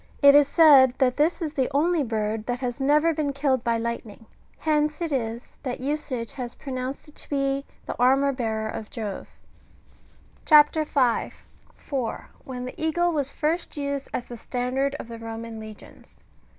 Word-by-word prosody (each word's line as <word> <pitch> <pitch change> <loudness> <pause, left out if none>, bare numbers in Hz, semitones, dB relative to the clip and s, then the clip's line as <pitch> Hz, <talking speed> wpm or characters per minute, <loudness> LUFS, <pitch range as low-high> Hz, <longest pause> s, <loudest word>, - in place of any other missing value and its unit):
^^ - - -32 0.2
It 280 - +10
is 290 -1 +6
said 280 -6 +7
that 255 -1 +2
this 320 +4 +1
is 305 -2 -3
the 265 -4 0
only 330 +3 +3
bird 220 -3 -2
that 245 0 -2
has 250 0 -3
never 300 +4 +3
been 295 -2 -1
killed 270 -3 0
by 235 -1 +1
lightning; 230 -2 -5 0.3
hence 300 -1 0
it 335 -2 -2
is, 235 -2 -3
that 255 -3 -4
usage 260 -4 -3
has 245 -3 -6
pronounced 260 0 -5
it - - -17
to - - -11
be 275 -1 0 0.2
the - - -4
armour 270 +3 +4
bearer 220 -4 -2
of 215 0 -6
Jove. 215 -5 -6 1.1
CHAP. 300 -1 +7
5. 255 -6 0 0.3
(4.) 255 -6 -4
WHEN 250 -1 -6
THE 255 - -7
EAGLE 345 +2 +2
WAS 285 -4 -1
FLBST 320 +2 -2
USED 280 -1 -3
AS 245 - -3
THE 240 - -9
STANDAED 255 +4 -2
OF - - -7
THE 230 -1 -8
EOMAN 225 0 -7
LEGIONS. 215 -1 -13
265 Hz, 175 wpm, -25 LUFS, 235-295 Hz, 1.1 s, It